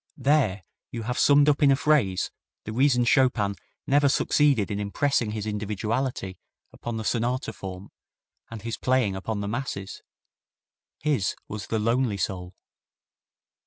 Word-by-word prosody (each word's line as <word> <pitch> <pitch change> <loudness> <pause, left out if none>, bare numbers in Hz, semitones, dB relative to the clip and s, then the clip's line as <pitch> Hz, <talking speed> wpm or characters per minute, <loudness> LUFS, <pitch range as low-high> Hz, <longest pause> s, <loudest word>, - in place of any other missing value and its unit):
There 130 -8 +2 0.3
you 115 -1 -5
have 125 +3 -2
summed 145 0 +5
up 150 0 +3
in 145 - +6
a 135 - +5
phrase 135 - +1 0.3
the 110 - -6
reason 125 0 +3
Chopin 120 -6 +3 0.3
never 145 +1 +4
succeeded 135 -7 +2
in 100 - -2
impressing 120 +3 0
his 105 -1 -4
individuality 105 0 -3 0.3
upon 120 -1 -5
the 110 - -4
sonata 120 +5 -1
form 95 0 -8 0.6
and 115 -2 -8
his 115 -1 -4
playing 125 -6 +1
upon 100 +2 -3
the 100 - -3
masses. 105 -4 -4 1.0
His 145 -10 0
was 105 -2 -6
the 110 - -1
lonely 115 0 +1
soul. 90 0 -4
115 Hz, 140 wpm, -26 LUFS, 100-135 Hz, 1.0 s, in